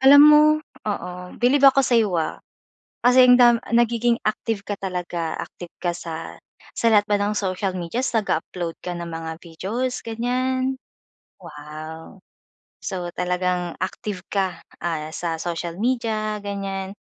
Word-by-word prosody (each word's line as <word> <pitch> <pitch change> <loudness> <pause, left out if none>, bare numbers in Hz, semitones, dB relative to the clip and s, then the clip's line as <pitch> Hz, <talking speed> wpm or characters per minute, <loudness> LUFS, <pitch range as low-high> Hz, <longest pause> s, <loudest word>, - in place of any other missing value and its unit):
Alam 275 +2 +9
mo 300 0 +8 0.5
oo. 200 -3 -3 0.3
Bilib 255 +3 +3
ako 275 +1 +4
sa'yo, 230 -4 +3
ah, 160 -1 -2 0.6
kasi 250 +1 +7
ang 250 - +8
dam 240 -1 +8 0.2
nagiging 235 0 +3
active 215 -1 -1
ka 205 - -3
talaga. 175 -3 -3
Active 175 -1 -9
ka 175 -1 +1
sa 165 -2 -7 0.4
sa 230 - 0
lahat 205 -1 +5
ba 205 - +3
ng 205 +1 0
social 190 -1 -1
medias 230 +10 -2
nag-a-upload 175 -4 -2
ka 180 - -3
ng 170 0 -5
mga 165 0 -5
videos, 220 +10 -3
ganyan? 255 +3 -1 0.7
Wow! 155 +2 -10 0.6
So, 180 -2 -3
talagang 180 -1 -1
active 185 0 -4
ka, 190 -2 -1 0.2
ah, 155 -2 -2
sa 165 -2 -2
social 170 0 -4
media, 220 -3 0
ganyan, 195 -1 -4
195 Hz, 135 wpm, -23 LUFS, 175-235 Hz, 0.7 s, Alam